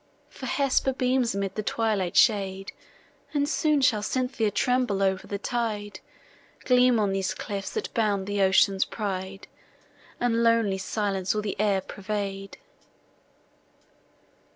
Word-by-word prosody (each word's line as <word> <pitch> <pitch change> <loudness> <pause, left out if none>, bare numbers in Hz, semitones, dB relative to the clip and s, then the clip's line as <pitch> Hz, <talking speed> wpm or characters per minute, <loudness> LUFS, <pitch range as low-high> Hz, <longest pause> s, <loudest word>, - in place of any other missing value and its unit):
For 260 - -8
Hesper 270 0 +1
beams 255 -3 +1
amid 200 -1 -2
the 215 - -3
twilight 210 -4 -1
shade, 195 -3 +2 0.6
And 285 0 +2
soon 305 -1 +1
shall 245 -6 +3
Cynthia 250 -1 -1
tremble 240 -2 +1
o'er 190 -1 +2
the 200 - -4
tide, 210 -3 -3 0.7
Gleam 250 -2 +4
on 205 -2 +1
these 190 -1 -1
cliffs, 195 0 -5
that 440 - -4
bound 205 -4 0
the 205 0 -1
ocean's 190 0 +4
pride, 195 -2 -5 0.7
And 235 -1 +1
lonely 230 -4 +2
silence 195 -1 -1
all 210 - -1
the 205 - -3
air 200 -2 +2
pervade. 195 0 -5
210 Hz, 130 wpm, -26 LUFS, 195-240 Hz, 0.7 s, Gleam